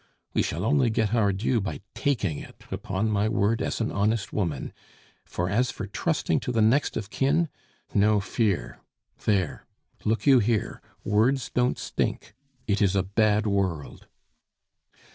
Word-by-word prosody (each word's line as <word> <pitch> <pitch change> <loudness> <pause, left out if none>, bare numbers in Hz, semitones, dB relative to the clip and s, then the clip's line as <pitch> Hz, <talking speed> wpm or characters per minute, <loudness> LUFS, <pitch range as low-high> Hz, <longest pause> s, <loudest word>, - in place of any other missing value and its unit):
We - - +2
shall 85 +6 -2
only 130 0 +3
get 110 -1 0
our 105 -4 +3
due 110 +4 0
by 100 - -4
taking 105 - 0
it, - - -12
upon 100 +3 -1
my 105 +1 +1
word, 110 0 +1
as - - -2
an 110 - -1
honest 105 0 0
woman, 85 - -2 0.5
for 90 - -2
as 120 +7 +1
for 100 - -5
trusting 145 - 0
to 125 - -3
the 115 - 0
next 115 +7 +3
of 110 -1 -5
kin! 155 +5 +2 0.4
No 105 +1 +4
fear! 105 -1 -1 0.5
There! 95 -8 0 0.4
look 110 -1 0
you 135 -3 +7
here, 110 -1 0 0.2
words 120 +6 +2
don't 125 0 +2
stink; - - -3 0.3
it 105 -1 0
is 100 -1 +3
a 95 - +2
bad 105 +2 +2
world!" 95 -8 -2
105 Hz, 155 wpm, -26 LUFS, 100-120 Hz, 0.5 s, you